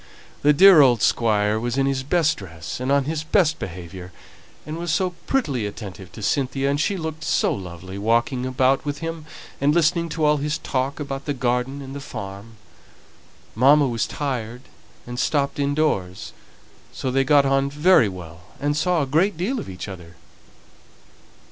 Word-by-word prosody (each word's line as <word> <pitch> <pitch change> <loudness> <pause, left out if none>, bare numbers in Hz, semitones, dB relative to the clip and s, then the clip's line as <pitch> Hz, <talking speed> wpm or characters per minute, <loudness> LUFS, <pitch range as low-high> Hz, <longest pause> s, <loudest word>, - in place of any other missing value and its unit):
The 145 - +5
dear 180 +1 +8
old 125 -4 +4
Squire 105 -2 +2
was 120 +2 -2
in 135 - +2
his 135 -1 0
best 160 +3 +1
dress 85 -1 -8
and 130 +2 -2
on 140 0 +3
his 155 +2 -3
best 160 0 +2
behaviour, 90 0 -8 0.5
and 155 +2 -5
was 170 -1 -2
so 185 +2 +1 0.2
prettily 140 - 0
attentive 100 -3 -9
to 110 - -9
Cynthia, 135 +3 0
and 145 +1 0
she 200 +4 0
looked 160 -2 -5
so - - +1
lovely, 95 0 -8
walking 120 +4 +1
about 130 +1 +1
with 145 -1 -3
him, 165 -1 -6 0.3
and 145 +2 +3
listening 170 0 +2
to 155 -1 -1
all 150 0 +4
his 150 +1 -2
talk 135 +2 -2
about 140 -2 -5
the 145 - -2
garden 125 +2 -1
and 135 +1 -7
farm. 100 -2 -8 1.0
Mamma 140 +5 +5
was 115 -3 -1
tired, 125 -4 -4 0.4
and 120 0 -6
stopped 140 -1 0
in 145 0 0
doors, 95 -13 -1 0.6
so 130 - -3
they 135 +1 +2
got 140 +1 +4
on 135 0 +2
very 150 - +4
well, 85 -2 -10 0.2
and 145 +1 0
saw 170 +1 +1
a - - -1
great 160 +8 +1
deal 230 +10 -1
of - - -7
each 90 +1 -7
other." 90 -3 -10
135 Hz, 175 wpm, -22 LUFS, 115-150 Hz, 1.0 s, dear